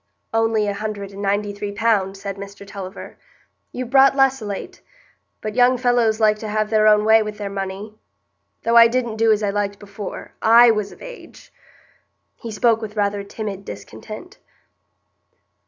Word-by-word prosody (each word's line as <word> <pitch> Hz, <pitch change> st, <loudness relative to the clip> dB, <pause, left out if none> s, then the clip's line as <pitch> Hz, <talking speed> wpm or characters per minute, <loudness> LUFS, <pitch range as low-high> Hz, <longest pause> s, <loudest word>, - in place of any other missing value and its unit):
"Only 225 Hz, -1 st, +1 dB
a 205 Hz, -, -1 dB
hundred 200 Hz, -1 st, -5 dB
and 200 Hz, 0 st, -9 dB
ninety 205 Hz, +1 st, -1 dB
three 205 Hz, 0 st, -5 dB
pound," 200 Hz, -2 st, 0 dB
said 195 Hz, 0 st, -6 dB
Mr 200 Hz, 0 st, -10 dB
Tulliver. 195 Hz, -2 st, -9 dB, 0.5 s
"You've 250 Hz, -1 st, -6 dB
brought 275 Hz, 0 st, +6 dB
less 270 Hz, -2 st, +3 dB
o' 215 Hz, -, -6 dB
late; 200 Hz, -1 st, -7 dB, 0.6 s
but 215 Hz, 0 st, -4 dB
young 250 Hz, +2 st, +4 dB
fellows 240 Hz, -3 st, +2 dB
like 215 Hz, -1 st, +3 dB
to 220 Hz, -, -6 dB
have 215 Hz, 0 st, -1 dB
their 215 Hz, -1 st, +4 dB
own 210 Hz, 0 st, +5 dB
way 220 Hz, 0 st, +6 dB
with 210 Hz, -1 st, -5 dB
their 205 Hz, -1 st, -5 dB
money. 195 Hz, +2 st, -5 dB, 0.7 s
Though 230 Hz, +1 st, +3 dB
I 230 Hz, 0 st, +9 dB
didn't 235 Hz, -2 st, -2 dB
do 225 Hz, 0 st, +3 dB
as 215 Hz, 0 st, +1 dB
I 200 Hz, -, +1 dB
liked 200 Hz, 0 st, -2 dB
before 200 Hz, -1 st, -8 dB
I 235 Hz, +1 st, +7 dB
was 210 Hz, -2 st, -2 dB
of -, -, -14 dB
age." -, -, -12 dB, 0.8 s
He 235 Hz, -, -8 dB
spoke 225 Hz, +1 st, +2 dB
with 215 Hz, -1 st, -7 dB
rather 205 Hz, -1 st, 0 dB
timid 200 Hz, -1 st, -6 dB
discontent. 355 Hz, -, -10 dB
215 Hz, 170 wpm, -21 LUFS, 200-230 Hz, 0.8 s, I